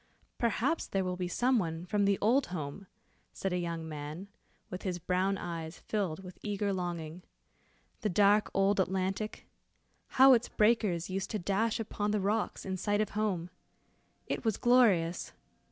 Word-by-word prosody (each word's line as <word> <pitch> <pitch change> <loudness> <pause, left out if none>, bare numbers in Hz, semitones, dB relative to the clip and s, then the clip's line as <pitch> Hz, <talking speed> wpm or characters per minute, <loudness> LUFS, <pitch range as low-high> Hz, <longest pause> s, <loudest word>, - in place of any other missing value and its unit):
"Perhaps 240 +7 0
there 195 -1 0
will 180 0 -2
be 180 0 -3
some 245 +7 +2
one 165 -2 -3
from 205 +2 +1
the 200 -1 +3
old 245 +6 +3
home," 175 +2 -6 0.5
said 190 -1 -2
a 180 - 0
young 170 -2 -3
man, 155 +5 -7 0.4
with 180 - -5
his 185 -3 -2
brown 185 +3 0
eyes 165 -2 -5
filled 190 -5 -3
with 185 -1 -11
eager 205 -1 -1
longing. 175 -2 -4 0.8
"The 210 - -1
dark 205 +3 +4
old 195 +1 +2
Atlantic! 190 +3 -1 0.7
how 265 0 +9
its 235 -1 +2
breakers 210 -6 +2
used 195 +1 -2
to 215 - -2
dash 210 +5 0
upon 210 -1 -2
the 210 0 +1
rocks 210 +3 -1
in 190 -1 -2
sight 205 +3 0
of 215 - +1
home. 190 -5 -1 0.7
It - - -3
was 220 -4 +1
glorious. 205 -9 +3
195 Hz, 160 wpm, -31 LUFS, 175-210 Hz, 0.8 s, how